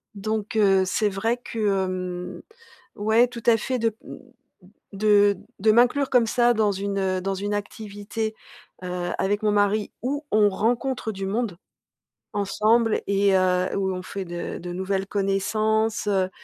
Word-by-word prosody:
Donc 215 +1 -3
heu, 195 -3 +4
c'est 210 +3 +1
vrai 220 +5 -1
que, 235 -2 -8 0.3
hem, 180 -1 -5 0.6
ouais, 220 +3 +3
tout 235 -1 -9
à 235 -1 +6
fait, 255 +3 -2
de, 225 -2 0
mmh, - - -9 0.8
de 205 0 +4 0.2
de 215 +2 +4
m'inclure 250 +4 +3
comme 245 -3 +4
ça, 240 +1 +3
dans 215 -2 +2
une, 200 +1 -3
heu, 185 -1 0
dans 195 +1 -2
une 205 +2 -3
activité, 210 +1 -5 0.5
heu, 180 -1 -3
avec 205 +2 0
mon 210 -1 +2
mari 205 +1 +1
où 285 +4 -2
on 210 -1 +4
rencontre 230 +3 -1
du 195 -1 -5
monde 205 -3 -2 0.8
ensemble 215 +3 +2
et 200 0 +2
heu, 185 0 +1
où 190 -1 0
on 185 - -5
fait 195 0 -6
de 175 0 -5
de 175 0 -6
nouvelles 190 +1 -2
connaissances, 215 +3 0
heu, 190 -2 +1
205 Hz, 155 wpm, -24 LUFS, 190-220 Hz, 0.8 s, à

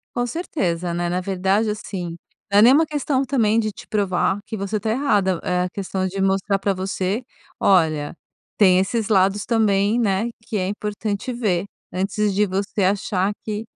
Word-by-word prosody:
Com 245 0 0
certeza, 180 - -2
né? 175 0 -1
Na 180 +1 -1
verdade, 195 +3 0
assim, 185 -5 -5 0.3
não 200 - +4
é - - +8
nem 245 +3 +8
uma 320 +3 +5
questão 285 -2 0
também 230 -4 +2
de 215 -1 -1
te - - -12
provar 195 -2 0
que 220 - -6
você 200 +1 -2
tá 220 - -2
errada. 205 -8 +1
É 180 0 +1
a 180 - -2
questão 190 -1 -3
de 195 +1 -4
mostrar 195 +1 +1
pra 195 0 0
você: 190 +4 -2 0.4
"Olha, 160 -6 +2 0.4
tem 185 -3 +6
esses 215 +3 -1
lados 195 0 +3
também, 215 -1 +2
né, 205 -1 +1 0.2
que 225 -3 -4
é 185 - -1
importante 210 +3 -3
ver." 205 -8 0 0.3
Antes 200 +2 0
de 210 +1 +3
você 195 +2 -2
achar 195 0 +1
que 215 0 -3
200 Hz, 180 wpm, -22 LUFS, 185-220 Hz, 0.4 s, é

